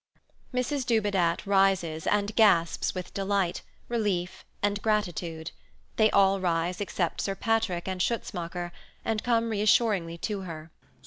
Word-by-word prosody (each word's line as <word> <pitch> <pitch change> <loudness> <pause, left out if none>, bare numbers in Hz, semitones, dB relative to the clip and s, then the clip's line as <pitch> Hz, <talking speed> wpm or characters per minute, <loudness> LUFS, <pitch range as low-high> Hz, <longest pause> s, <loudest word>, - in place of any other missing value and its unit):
Mrs 255 +2 -1
Dubedat 205 -8 +1
rises 190 -5 +2
and 205 0 +1
gasps 175 -8 +3
with 180 -1 -6
delight, 195 -2 0 0.3
relief, 200 -6 -1 0.2
and 205 0 +1
gratitude. 175 -6 -1 0.5
They 220 -1 +5
all 195 -1 +4
rise 175 0 0
except 185 -4 -1
Sir 195 - -2
Patrick 220 -6 0
and 185 -1 -2
Schutzmacher, 175 -5 -2 0.3
and 220 -1 -1
come 230 -2 +1
reassuringly 205 -4 +2
to 205 +3 -3
her. 165 -3 -8
195 Hz, 125 wpm, -28 LUFS, 175-215 Hz, 0.5 s, They